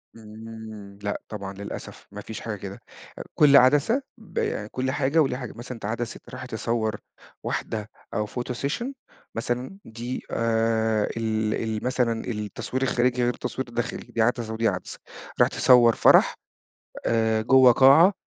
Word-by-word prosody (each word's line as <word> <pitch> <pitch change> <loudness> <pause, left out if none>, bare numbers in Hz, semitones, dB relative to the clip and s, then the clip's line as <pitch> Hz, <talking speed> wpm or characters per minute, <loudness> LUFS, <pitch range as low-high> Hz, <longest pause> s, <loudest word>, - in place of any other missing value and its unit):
امم، 110 -2 -10
لأ 100 - -2
طبعًا 100 -2 -6
للأسف، 100 +1 -8
ما 105 +1 -7
فيش 110 +1 -7
حاجة 110 -2 -4
كده، 100 0 -8 0.4
آآ، - - -5
كل 140 -2 +7
عدسة 145 - +4 0.2
ب 175 - -3
كل 130 +1 -1
حاجة 145 +3 +2
وليها 135 -3 0
حاجة، 125 -3 -7
مثلًا 120 +2 -7
أنت 110 - -9
عدسة 115 +2 -3
رايح 130 0 -7
تصور 110 -2 -1 0.5
واحدة 110 -1 -3 0.2
أو 105 -1 -1
photo 125 +2 -4
session 145 - -2 0.5
مثلًا 125 +9 -3
دي 120 +3 -6
آآ، 110 -1 +1
ال 110 -1 0 0.2
ال - - -6
مثلًا 125 -3 0
التصوير 105 +4 -3
الخارجي 125 -1 +1
غير 120 - +2
التصوير 125 +1 -4
الداخلي، 120 +1 -4
دي 115 - 0
عدسة، 115 -1 0
ودي 115 0 +1
عدسة، - - -4 0.4
رايح - - +5
تصوّر 120 -2 +5
فرَح، - - +5 0.7
آآ، 110 -1 +2
جوّه 130 +1 +7
قاعة 140 - +7
115 Hz, 150 wpm, -25 LUFS, 110-130 Hz, 0.7 s, كل